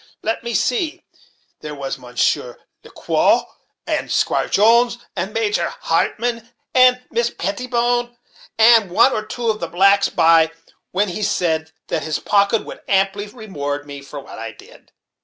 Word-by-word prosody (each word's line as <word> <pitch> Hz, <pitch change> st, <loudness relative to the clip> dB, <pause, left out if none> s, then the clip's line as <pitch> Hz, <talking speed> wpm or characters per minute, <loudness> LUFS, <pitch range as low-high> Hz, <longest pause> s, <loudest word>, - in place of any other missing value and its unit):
Let 225 Hz, +1 st, -2 dB
me 235 Hz, -1 st, -3 dB
see 320 Hz, +7 st, -1 dB, 0.6 s
there 150 Hz, -1 st, -7 dB
was 135 Hz, -1 st, -5 dB
Mounshier 125 Hz, 0 st, -1 dB, 0.3 s
Ler -, -, -14 dB
Quow, -, -, +1 dB, 0.4 s
and -, -, -2 dB
Squire -, -, +1 dB
Jones, 235 Hz, +3 st, +4 dB, 0.2 s
and 195 Hz, -, -3 dB
Major 210 Hz, -6 st, 0 dB
Hartmann, 230 Hz, +7 st, -1 dB, 0.2 s
and 255 Hz, -1 st, +5 dB
Miss 235 Hz, 0 st, +1 dB
Pettibone, 240 Hz, +4 st, -1 dB, 0.4 s
and 225 Hz, -3 st, +6 dB
one 230 Hz, +9 st, +4 dB
or 215 Hz, -, -2 dB
two 230 Hz, +1 st, -2 dB
of 215 Hz, -, -6 dB
the 170 Hz, -, -3 dB
blacks 195 Hz, +3 st, +3 dB
by, 165 Hz, -1 st, +4 dB, 0.4 s
when 200 Hz, +2 st, 0 dB
he 180 Hz, +4 st, -5 dB
said 160 Hz, -5 st, 0 dB, 0.2 s
that 160 Hz, -, -1 dB
his 155 Hz, +1 st, -2 dB
pocket 200 Hz, +2 st, +1 dB
would -, -, -10 dB
amply 195 Hz, +1 st, +1 dB
reward 145 Hz, -, -5 dB
me 140 Hz, -1 st, -9 dB
for 140 Hz, +1 st, -9 dB
what 140 Hz, -, -11 dB
I 115 Hz, -1 st, -6 dB
did." -, -, -18 dB
205 Hz, 155 wpm, -19 LUFS, 160-235 Hz, 0.6 s, and